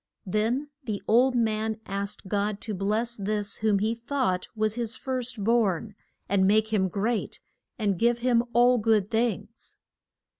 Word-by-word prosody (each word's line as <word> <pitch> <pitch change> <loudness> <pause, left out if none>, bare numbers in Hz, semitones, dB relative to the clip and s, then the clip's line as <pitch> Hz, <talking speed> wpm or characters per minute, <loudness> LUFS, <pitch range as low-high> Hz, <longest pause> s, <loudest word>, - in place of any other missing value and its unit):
Then 230 +9 -1
the 215 -5 -4
old 250 +3 +4
man 220 -1 0
asked 200 +1 -4
God 205 +1 -1
to 220 - -4
bless 215 +5 0
this 205 0 -3
whom 215 -2 +2
he 215 +3 0
thought 235 -6 -1
was 215 -1 0
his 235 0 -3
first 250 -4 -3
born, 215 -2 +1 0.3
and 190 -1 +3
make 215 +2 +3
him 190 -3 +3
great, 210 +5 -2 0.4
and 200 -5 0
give 235 0 +3
him 240 -1 +2
all 245 +1 +4
good 215 -2 +2
things. 225 -1 -2
220 Hz, 150 wpm, -27 LUFS, 205-235 Hz, 0.4 s, old